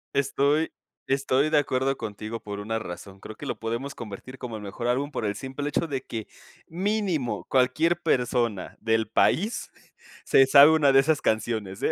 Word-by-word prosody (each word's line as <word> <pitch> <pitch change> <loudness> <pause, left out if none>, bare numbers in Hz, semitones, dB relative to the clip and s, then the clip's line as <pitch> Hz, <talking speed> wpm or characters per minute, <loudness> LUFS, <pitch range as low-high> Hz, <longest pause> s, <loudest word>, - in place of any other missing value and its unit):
Estoy 140 +3 +1 0.4
estoy 135 +1 +1
de 155 - +4
acuerdo 135 -1 0
contigo 110 +1 -6
por 105 -2 -7
una 115 +2 -2
razón. 95 0 -9
Creo 110 - -9
que - - -9
lo - - -4
podemos 115 +5 -3
convertir 120 +3 -9
como 120 -3 -6
el 105 - -7
mejor 105 +4 -5
álbum 135 +4 0
por 115 - -3
el 100 -1 -1
simple 135 +5 -5
hecho 165 - -1
de 135 -4 -3
que 110 -2 -6 0.4
mínimo 185 - -1
cualquier 155 +7 +2
persona 120 -5 0
del 110 -1 +1
país 200 - +1 0.5
se 135 - +5
sabe 140 +3 +8
una 150 -4 +4
de 135 - +7
esas 150 +1 +1
canciones, 110 -3 -1
¿eh? - - +2
130 Hz, 175 wpm, -26 LUFS, 110-145 Hz, 0.5 s, sabe